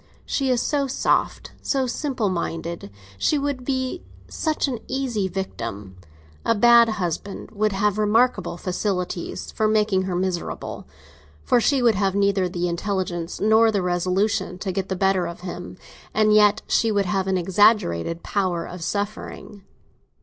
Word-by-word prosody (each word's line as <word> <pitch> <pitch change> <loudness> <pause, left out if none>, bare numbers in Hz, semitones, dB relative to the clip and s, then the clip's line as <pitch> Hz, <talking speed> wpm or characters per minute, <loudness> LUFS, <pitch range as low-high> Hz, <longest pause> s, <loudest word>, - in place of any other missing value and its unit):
She 270 -2 -1
is 250 -2 +2
so 285 -2 0
soft, 260 - 0
so 270 -2 0
simple 255 -3 -2
minded, 170 - -4 0.3
she 300 - +2
would 280 -2 -2
be 260 +5 -2 0.3
such 310 -2 -1
an 250 -4 -3
easy 250 -7 -1
victim! 105 - -5 0.5
A 230 - +2
bad 235 +1 +6
husband 195 -1 -4
would 215 0 0
have 205 +1 0
remarkable 210 -4 +2
facilities 180 -1 -3
for 220 - +1
making 210 -3 +2
her 185 -2 -2
miserable; 180 -1 -3 0.6
for 245 - +3
she 270 +1 +2
would 235 -2 +5
have 195 -1 0
neither 200 -2 +2
the 175 0 -2
intelligence 175 -1 -3
nor 220 +2 +5
the 200 -3 0
resolution 180 +2 0
to 190 +1 -3
get 190 +1 -3
the 190 - -1
better 190 -1 +1
of 170 - -8
him, 180 0 -7 0.4
and 215 0 +4
yet 210 0 +5
she 225 - +2
would 200 -1 +1
have 190 +1 -1
an 190 -1 +1
exaggerated 175 - +2
power 185 -4 -1
of 180 -1 -8
suffering. 205 +2 -4
200 Hz, 150 wpm, -23 LUFS, 180-225 Hz, 0.6 s, bad